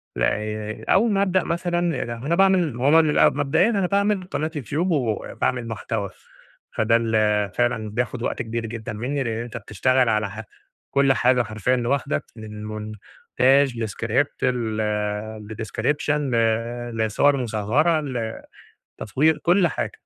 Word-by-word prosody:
ل -, -, -4 dB
ي 105 Hz, 0 st, -2 dB
أول 220 Hz, +4 st, +3 dB
ما 195 Hz, -1 st, +2 dB
أبدأ 185 Hz, -2 st, +2 dB
مثلًا 175 Hz, 0 st, -1 dB, 0.2 s
ل -, -, -8 dB
أنا 130 Hz, +8 st, -2 dB
باعمل 190 Hz, -5 st, +3 dB
ما 120 Hz, +2 st, -3 dB
هو -, -, +5 dB
ما 165 Hz, +1 st, +7 dB
بيبقى 150 Hz, -2 st, +4 dB
مبدئيًا 145 Hz, +8 st, +2 dB
أنا 200 Hz, -5 st, +1 dB
باعمل 200 Hz, 0 st, +1 dB
قناة 155 Hz, -2 st, -3 dB
يوتيوب 150 Hz, -, -1 dB
وباعمل 125 Hz, -2 st, -1 dB
محتوى، 110 Hz, -2 st, -3 dB, 0.6 s
فده 110 Hz, +1 st, +2 dB
اللي 110 Hz, -3 st, +1 dB
فعلًا 120 Hz, -3 st, 0 dB
بياخد 120 Hz, +2 st, -3 dB
وقت -, -, -2 dB
كبير 115 Hz, 0 st, -3 dB
جدًا 110 Hz, -1 st, -6 dB
مني، 130 Hz, +6 st, -2 dB
لإن 115 Hz, -1 st, -3 dB
أنت 120 Hz, 0 st, -7 dB
بتشتغل 130 Hz, +3 st, +1 dB
على 105 Hz, -2 st, +1 dB
ح 110 Hz, +1 st, -7 dB, 0.5 s
كل 140 Hz, -1 st, +4 dB
حاجة 125 Hz, -1 st, +3 dB
حرفيًا 110 Hz, +3 st, 0 dB
لوحدك، 125 Hz, -, -1 dB
من 105 Hz, -1 st, -9 dB
مونتاج 115 Hz, +4 st, 0 dB
لscript 115 Hz, +6 st, -1 dB
ل 110 Hz, -3 st, -2 dB
لdescription 115 Hz, +7 st, -2 dB
ل 145 Hz, -4 st, 0 dB, 0.6 s
لصور 110 Hz, +6 st, +2 dB
مصغرة، 125 Hz, +8 st, +1 dB, 1.0 s
لتطوير 150 Hz, +9 st, +2 dB
كل 175 Hz, +3 st, +3 dB
حاجة، -, -, -3 dB
120 Hz, 145 wpm, -23 LUFS, 110-150 Hz, 1.0 s, ما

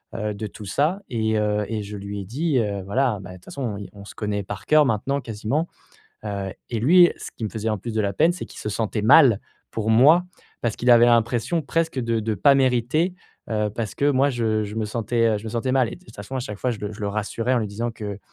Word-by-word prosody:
heu, 105 Hz, -1 st, -2 dB
de 105 Hz, +1 st, -5 dB
tout 105 Hz, +2 st, -11 dB
ça 155 Hz, -, 0 dB
et 110 Hz, -2 st, 0 dB
heu 105 Hz, 0 st, 0 dB
et 110 Hz, -1 st, -3 dB
je 105 Hz, +1 st, -7 dB
lui 100 Hz, +1 st, -6 dB
ai -, -, -7 dB
dit, 140 Hz, -, 0 dB
heu, 100 Hz, -3 st, -1 dB
voilà 120 Hz, +1 st, +1 dB
bah, 90 Hz, -, -9 dB
de -, -, -9 dB
toute 90 Hz, -, -21 dB
façon, 120 Hz, -7 st, -4 dB
i 100 Hz, -, -8 dB
on 100 Hz, 0 st, -12 dB
se -, -, -12 dB
connaît 105 Hz, -2 st, -2 dB
par 100 Hz, 0 st, -7 dB
cœur 155 Hz, -1 st, +6 dB
maintenant, 135 Hz, +4 st, 0 dB
quasiment, 120 Hz, +8 st, -2 dB, 0.6 s
heu, 100 Hz, -2 st, -3 dB, 0.2 s
et 115 Hz, -, -1 dB
lui, 175 Hz, +7 st, +6 dB
ce -, -, -8 dB
qui 115 Hz, -, -5 dB
me 110 Hz, -, -1 dB
faisait 110 Hz, 0 st, -3 dB
en 110 Hz, -, -1 dB
plus 115 Hz, +4 st, -6 dB
de 110 Hz, -, +1 dB
la 100 Hz, -1 st, -1 dB
peine, 160 Hz, -, +3 dB
c'est 180 Hz, -, -7 dB
qu'il -, -, -11 dB
se 105 Hz, -, -4 dB
sentait 105 Hz, 0 st, -2 dB
mal 125 Hz, -2 st, +6 dB, 0.3 s
pour 110 Hz, 0 st, -1 dB
moi. 150 Hz, +10 st, +6 dB, 0.4 s
Parce 115 Hz, -3 st, -1 dB
qu'il 125 Hz, -, +2 dB
avait 120 Hz, 0 st, +7 dB
l'impression 120 Hz, +7 st, +2 dB
presque 165 Hz, -1 st, -1 dB
de 115 Hz, -2 st, 0 dB
de 110 Hz, 0 st, -1 dB
pas 140 Hz, +8 st, +5 dB
mériter, 135 Hz, +7 st, +2 dB, 0.4 s
heu, 105 Hz, -1 st, 0 dB
parce 110 Hz, 0 st, -4 dB
que 145 Hz, +1 st, +3 dB
moi, 140 Hz, +1 st, +3 dB
je 110 Hz, -3 st, 0 dB
je 105 Hz, +1 st, -7 dB
me 110 Hz, -, 0 dB
sentais, 115 Hz, +1 st, 0 dB
heu 110 Hz, -2 st, +1 dB
je 105 Hz, -, -12 dB
me 110 Hz, -, -4 dB
sentais 120 Hz, +3 st, -1 dB
mal, 130 Hz, -3 st, +3 dB
et -, -, -7 dB
de -, -, -21 dB
toute 115 Hz, -, -16 dB
façon, 105 Hz, +6 st, -6 dB
à -, -, -1 dB
chaque 105 Hz, -5 st, -6 dB
fois, 125 Hz, -, 0 dB
je 110 Hz, -, -7 dB
le 105 Hz, +1 st, -4 dB
je 105 Hz, -, -11 dB
le 100 Hz, -, -1 dB
rassurais 110 Hz, +4 st, -1 dB
en -, -, +3 dB
lui 110 Hz, -, -1 dB
disant 115 Hz, +4 st, -3 dB
que: 105 Hz, -3 st, -6 dB
115 Hz, 270 wpm, -23 LUFS, 105-130 Hz, 0.6 s, avait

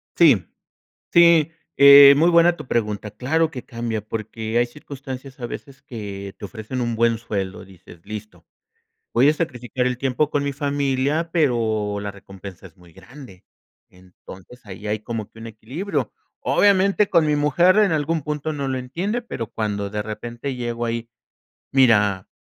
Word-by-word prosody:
Sí, 135 Hz, -, +5 dB, 0.6 s
sí, 170 Hz, -2 st, +5 dB, 0.3 s
eh, 140 Hz, 0 st, +10 dB
muy 165 Hz, +4 st, +4 dB
buena 170 Hz, 0 st, +4 dB
tu -, -, -10 dB
pregunta, 105 Hz, -3 st, -2 dB
claro 160 Hz, +7 st, 0 dB
que 125 Hz, -6 st, -7 dB
cambia 115 Hz, -2 st, -4 dB
porque 110 Hz, +1 st, -4 dB
hay 120 Hz, -, +3 dB
circunstancias 135 Hz, 0 st, -10 dB
a 120 Hz, -, -4 dB
veces 140 Hz, +3 st, -9 dB
que 100 Hz, -7 st, -7 dB
te 100 Hz, -, -6 dB
ofrecen 120 Hz, +4 st, -6 dB
un 120 Hz, -1 st, -2 dB
buen 115 Hz, 0 st, +2 dB
sueldo, 100 Hz, -5 st, -5 dB
dices: 95 Hz, -3 st, -16 dB
"Listo, 105 Hz, 0 st, -9 dB, 0.7 s
voy 130 Hz, +5 st, +5 dB
a 150 Hz, -, +3 dB
sacrificar 125 Hz, -5 st, -3 dB
el 125 Hz, -1 st, -2 dB
tiempo 135 Hz, +2 st, 0 dB
con 145 Hz, -1 st, -1 dB
mi 140 Hz, -, -2 dB
familia, 145 Hz, +3 st, -1 dB
pero 110 Hz, -9 st, 0 dB
la 100 Hz, 0 st, -5 dB
recompensa 95 Hz, -1 st, -12 dB
es 85 Hz, -, -25 dB
muy 90 Hz, -2 st, -19 dB
grande", 95 Hz, -1 st, -14 dB, 0.5 s
entonces 95 Hz, +5 st, -15 dB
ahí 100 Hz, +1 st, -10 dB
hay 105 Hz, 0 st, -1 dB
como 110 Hz, -1 st, -6 dB
que 115 Hz, -, -15 dB
un 115 Hz, -, -8 dB
equilibrio, 125 Hz, -, -4 dB, 0.3 s
obviamente 200 Hz, 0 st, +3 dB
con 170 Hz, -3 st, +3 dB
mi 150 Hz, -1 st, +1 dB
mujer 170 Hz, +7 st, +3 dB
en 210 Hz, -3 st, +4 dB
algún 155 Hz, +1 st, 0 dB
punto 150 Hz, +2 st, -3 dB
no 140 Hz, -2 st, -3 dB
lo 130 Hz, -1 st, -2 dB
entiende, 175 Hz, -, -3 dB
pero 115 Hz, -, -5 dB
cuando 105 Hz, -2 st, -3 dB
de 105 Hz, +1 st, -3 dB
repente 120 Hz, +5 st, -6 dB
llego 120 Hz, -1 st, -3 dB
ahí, 115 Hz, 0 st, -4 dB, 0.6 s
"Mira, 105 Hz, -7 st, +3 dB
120 Hz, 165 wpm, -22 LUFS, 105-145 Hz, 0.7 s, eh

